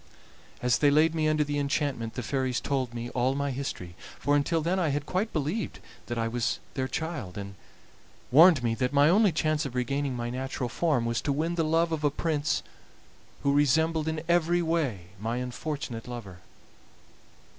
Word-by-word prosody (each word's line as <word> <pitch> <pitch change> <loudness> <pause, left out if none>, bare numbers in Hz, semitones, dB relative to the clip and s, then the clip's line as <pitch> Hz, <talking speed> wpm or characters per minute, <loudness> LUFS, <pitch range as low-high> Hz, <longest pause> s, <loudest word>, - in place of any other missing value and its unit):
"As 125 0 +3
they 145 - +5
laid 155 +3 +4
me 155 -1 +1
under 155 0 +3
the 145 0 -2
enchantment 140 -5 -1
the 125 - -3
fairies 130 0 -1
told 130 -4 -1
me 120 0 -5
all 130 +2 +1
my 140 0 -1
history, 125 -10 -5 0.2
for 145 +3 +1
until 145 +3 +2
then 180 +4 +1
I 170 -4 +1
had 145 +1 -1
quite 195 +7 -1
believed 160 +8 -2 0.3
that 120 - -3
I 115 0 0
was 120 0 -1 0.2
their 130 -1 -1
child, 130 - -4
and 100 0 -6 0.8
warned 160 0 +7
me 115 -1 +1
that 125 +3 -1
my 145 +2 +5
only 200 +2 +5
chance 155 -1 0
of 135 -3 -5
regaining 135 +2 -1
my 120 0 -3
natural 130 -1 -3
form 125 -2 +1
was 115 0 0
to 145 - -1
win 160 +5 0
the 170 -1 +1
love 165 +2 +2
of 155 -2 -2
a 145 - +4
prince 150 0 -1 0.8
who 140 - +3
resembled 155 +3 +2
in 160 0 -2
every 175 0 +3
way 140 - -1
my 115 +3 -2
unfortunate 125 -1 -4
lover. 110 -7 -8
140 Hz, 185 wpm, -28 LUFS, 125-160 Hz, 0.8 s, warned